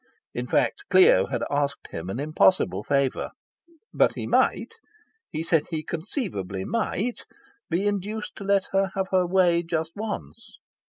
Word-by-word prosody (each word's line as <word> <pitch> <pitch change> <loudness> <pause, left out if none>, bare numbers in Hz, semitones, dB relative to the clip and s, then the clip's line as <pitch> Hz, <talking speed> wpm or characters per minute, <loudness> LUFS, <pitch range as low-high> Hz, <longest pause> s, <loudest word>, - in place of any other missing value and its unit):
In 125 +1 -4
fact, 125 -1 +1
Clio 185 - +6
had - - -2
asked 140 -1 -1
him 80 +3 -5
an 100 - -4
impossible 150 - +2
favour. 140 +1 0 0.6
But - - +3
he - - -4
might - - +1 0.6
he 160 - -3
said 165 -2 +2
he 160 -2 -3
conceivably 155 - -4
might 230 +1 -2 0.5
be 180 +4 0
induced 205 +1 -2
to 200 - -7
let 195 -1 +1
her 195 0 +2
have 190 0 -1
her 185 -1 +3
way 175 -2 +3
just 165 -1 -2
once. 220 +2 -6
170 Hz, 145 wpm, -25 LUFS, 140-195 Hz, 0.6 s, Clio